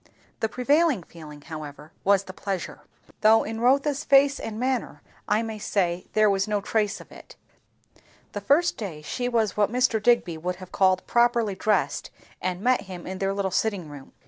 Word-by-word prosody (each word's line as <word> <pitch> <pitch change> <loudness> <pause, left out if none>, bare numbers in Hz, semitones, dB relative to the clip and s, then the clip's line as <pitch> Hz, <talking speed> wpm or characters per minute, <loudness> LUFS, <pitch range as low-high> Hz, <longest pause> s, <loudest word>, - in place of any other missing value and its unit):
The 220 - 0
prevailing 280 - +2
feeling 150 -3 -12
however 150 -1 -9
was 200 0 +3
the 185 - -10
pleasure; 195 -1 -5 0.4
though 220 +1 +5
in 225 +1 -5
Rotha's 275 +3 +2
face 275 -1 +4
and 220 0 -6
manner 250 - -2 0.2
I 215 +2 +2
may 220 -1 -5
say 180 -4 -1
there 215 0 +4
was 195 -1 +1
no 210 -1 0
trace 210 0 -1
of - - -14
it, - - -14 1.0
the 205 - -5
first 295 - +2
day 170 -8 -6
she 245 +10 -3
was 225 -5 0
what 210 0 +2
Mr. 245 -3 +2
Digby 205 -8 +2
would 180 +2 -3
have 185 0 -12
called 185 -1 +2
"properly 235 -3 +2
dressed," 210 +3 0 0.3
and 185 0 -2
met 250 +3 +2
him 180 -2 -8
in 190 0 -6
their 195 0 0
little 195 -1 -1
sitting 190 -5 -1
room. 145 -2 -12
210 Hz, 180 wpm, -25 LUFS, 185-240 Hz, 1.0 s, though